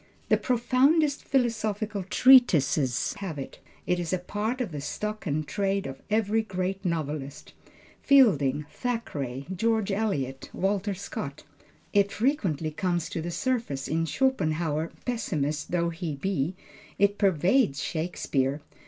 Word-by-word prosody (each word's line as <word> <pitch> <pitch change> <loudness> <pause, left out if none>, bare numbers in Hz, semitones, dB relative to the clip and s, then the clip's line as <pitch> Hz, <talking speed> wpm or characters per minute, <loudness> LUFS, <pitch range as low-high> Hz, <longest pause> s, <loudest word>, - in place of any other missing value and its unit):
The - - +5
profoundest 275 +5 +2
philosophical 215 -5 0
treatises 165 - +4
have 185 -7 -5
it. 135 - -7 0.3
It 180 - +1
is 170 -2 -3
a 185 - +2
part 210 +7 -3
of 240 -8 -2
the 145 -2 -5
stock 210 +7 -4
in 155 +1 0
trade 195 +4 -1
of 135 0 -7
every 215 +1 +2
great 190 -2 -3
novelist; 150 -5 -4 0.5
Fielding, 150 - +4
Thackeray, 145 - -3
George 220 +1 +1
Eliot, 145 -11 -2
Walter 195 +1 0
Scott. 155 -7 -6 0.5
It 200 0 +3
frequently 190 - 0
comes 175 0 -1
to 165 - -3
the 170 - -4
surface 225 - -2
in 165 +1 0
Schopenhauer 160 - 0
pessimist 155 - -2
though 170 -1 +1
he 165 -2 -4
be; 165 +1 -1 0.4
it 200 0 +2
pervades 185 - +3
Shakespeare. 150 -4 -1
185 Hz, 125 wpm, -27 LUFS, 150-220 Hz, 0.5 s, The